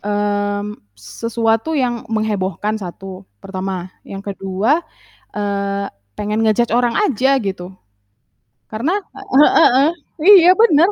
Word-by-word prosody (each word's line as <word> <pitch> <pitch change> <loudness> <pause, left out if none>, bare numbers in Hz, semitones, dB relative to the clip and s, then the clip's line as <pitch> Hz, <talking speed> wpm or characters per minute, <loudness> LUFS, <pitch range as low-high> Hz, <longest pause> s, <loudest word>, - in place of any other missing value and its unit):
mmm, 205 0 -2 0.2
sesuatu 230 - -2
yang 240 -5 -2
menghebohkan, 215 -1 -2
1, 190 +1 -8 0.2
pertama. 185 - -5
Yang 195 +1 -6
ke-2, 200 - 0 0.5
eee, 200 -1 -2 0.3
pengen 210 +2 -1
nge-judge 225 +2 +2
orang 240 -1 +1
aja 270 - +2
gitu. 190 -4 -5 1.0
Karena 280 - -1
he 300 -7 +1
he 325 - +5
heeh, 275 +5 +3 0.5
iya 360 - +7
bener, 350 -6 +5
215 Hz, 110 wpm, -18 LUFS, 200-245 Hz, 1.0 s, iya